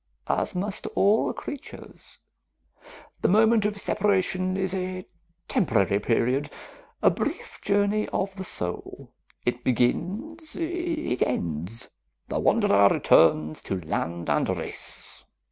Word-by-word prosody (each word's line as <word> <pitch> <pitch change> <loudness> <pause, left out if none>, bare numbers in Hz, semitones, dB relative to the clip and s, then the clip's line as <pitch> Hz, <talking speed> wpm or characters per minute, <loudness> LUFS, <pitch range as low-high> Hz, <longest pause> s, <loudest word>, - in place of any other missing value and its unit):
"As - - -1
must 200 +3 -2
all 205 +3 +3
creatures. 285 0 -9 1.0
The - - +3
moment 220 +2 +4
of 210 0 -1
separation 185 -2 +1
is 190 -1 -1
a 185 -1 -3 0.4
temporary 100 - +2
period, 125 +6 +1 0.5
a - - +6
brief - - -4
journey 205 +1 +1
of 195 0 -2
the 190 - -5
soul. 90 - -5 0.3
It 120 0 -1
begins, 205 - -1
it 335 - -2
ends. 85 +2 -2 0.4
The - - -1
wanderer 100 0 +4
returns 75 -4 +4
to 95 - -3
land 85 +1 -3
and - - +1
race...." - - -6
185 Hz, 110 wpm, -26 LUFS, -, 1.0 s, a